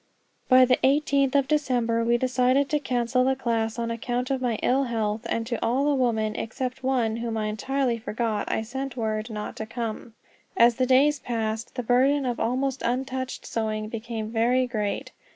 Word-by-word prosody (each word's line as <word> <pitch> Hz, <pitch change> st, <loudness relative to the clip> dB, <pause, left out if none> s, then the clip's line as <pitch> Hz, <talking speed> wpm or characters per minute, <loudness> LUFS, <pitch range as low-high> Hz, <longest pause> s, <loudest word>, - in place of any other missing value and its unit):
By 255 Hz, -1 st, +7 dB
the 250 Hz, 0 st, +2 dB
eighteenth 275 Hz, -1 st, +2 dB
of 275 Hz, -1 st, +3 dB
December 245 Hz, -6 st, +1 dB
we 235 Hz, +1 st, +3 dB
decided 255 Hz, +2 st, +2 dB
to 300 Hz, -, +2 dB
cancel 250 Hz, -2 st, 0 dB
the 265 Hz, +1 st, +2 dB
class 230 Hz, -3 st, -1 dB
on 230 Hz, 0 st, -2 dB
account 245 Hz, +2 st, -2 dB
of 265 Hz, -1 st, -1 dB
my 245 Hz, -3 st, 0 dB
ill 270 Hz, +2 st, +2 dB
health; 225 Hz, -1 st, -2 dB
and 230 Hz, -, -1 dB
to 235 Hz, -1 st, -3 dB
all 250 Hz, +5 st, +1 dB
the 295 Hz, -, +3 dB
women, 220 Hz, -5 st, 0 dB
except 255 Hz, +2 st, -4 dB
one 245 Hz, -4 st, 0 dB
whom 230 Hz, -1 st, -3 dB
I 215 Hz, -, -1 dB
entirely 240 Hz, +3 st, -1 dB
forgot, 225 Hz, -1 st, -2 dB
I 220 Hz, -, 0 dB
sent 265 Hz, +3 st, -5 dB
word 220 Hz, 0 st, -2 dB
not 210 Hz, -1 st, -5 dB
to 220 Hz, -, -5 dB
come. 230 Hz, -1 st, -5 dB, 0.4 s
As 235 Hz, 0 st, +5 dB
the 255 Hz, -1 st, +1 dB
days 280 Hz, +3 st, +4 dB
passed, 225 Hz, -1 st, -3 dB
the 250 Hz, -, -3 dB
burden 265 Hz, +4 st, +3 dB
of 245 Hz, -2 st, -1 dB
the -, -, -5 dB
almost 260 Hz, +3 st, -1 dB
untouched 260 Hz, +1 st, -3 dB
sewing 215 Hz, -1 st, -2 dB
became 225 Hz, -1 st, -5 dB
very 240 Hz, +3 st, +2 dB
great. 215 Hz, -5 st, -3 dB
240 Hz, 190 wpm, -25 LUFS, 225-260 Hz, 0.4 s, By